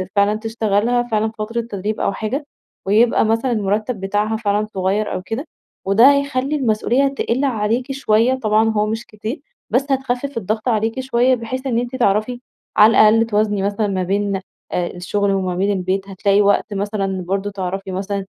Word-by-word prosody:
فعلًا 200 +1 +3
تشتغلها 225 +1 0
فعلًا 220 -2 -1
فترة 230 +2 -2
تدريب 210 -1 -4
أو - - 0
حاجة، 260 +9 -3 0.4
ويبقى 220 +5 +3
مثلًا 225 +4 +1
المرتّب 215 +1 -1
بتاعها 205 +3 -1
فعلًا 210 -1 0
صغيّر 195 +3 -1
أو - - -3
كده، 225 - -5 0.4
وده 225 +8 +6
هيخلّي 280 0 0
المسؤوليّة 250 +1 +1
تِقِل 275 -1 -1
عليكِ 240 +1 -1
شويّة 245 -2 +2
طبعًا 220 -3 +2
هو 210 -1 +1
مش 225 +2 -3
كتير، 215 +6 -6 0.3
بس 275 +2 0
هتخفِف 265 0 -1
الضغط 215 +3 -2
عليكِ 225 +2 0
شويّة 255 0 +2
بحيث 255 +3 -5
إن 235 -3 +1
أنتِ 245 +1 -4
تعرفي، 225 +1 +1 0.4
على 215 +2 +8
الأقل 225 +1 +5
توازني 210 -2 0
مثلًا 205 +1 0
ما 190 -2 -1
بين 200 +1 -1 0.3
الشغل 180 +3 -1
وما 185 -2 -1
بين 195 +3 +1
البيت، 190 0 -1
هتلاقي 200 +1 +2
وقت 205 +1 +2
مثلًا 195 -2 -2
برضو 195 +2 -1
تعرفي 195 0 -4
مثلًا، 195 +1 -3
215 Hz, 165 wpm, -19 LUFS, 200-240 Hz, 0.4 s, على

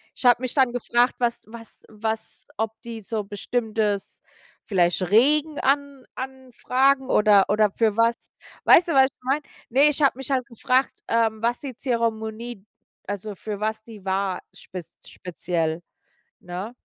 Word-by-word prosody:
Ich - - -11
habe 245 0 +6
mich 255 - -3
dann 260 -4 +3
gefragt, 245 +1 +1
was 240 -1 0
was 230 0 -13
was 220 0 -5
ob 220 0 -1
die 230 -2 -7
so 215 +1 -3
bestimmtes, 210 0 -2 0.4
vielleicht 180 -2 +2
Regen 295 +7 +3
an 280 -1 0
anfragen, 265 +1 0
oder 210 -2 +5
oder 210 -1 +3
für 220 -1 +1
was. 230 +1 +1 0.3
Weißt 345 +1 +7
du, - - +1
was 265 -1 +7
ich 260 -1 -9
meine? 275 +4 0 0.3
Ne, 265 +4 +4
ich 295 +1 -3
habe 275 - +4
mich 270 +1 -7
halt 255 -2 +1
gefragt, 255 +3 0
ähm, 225 -1 +1
was 240 +1 0
die 270 -4 -6
Zeremonie 230 -3 -3 0.4
also 205 0 -5
für 205 +1 -6
was 220 0 -2
die 215 -4 -13
war 190 -1 -1
spez 180 -3 -9 0.2
speziell, 170 -2 -3 0.6
ne? 185 +6 -6
230 Hz, 155 wpm, -24 LUFS, 210-255 Hz, 0.6 s, Weißt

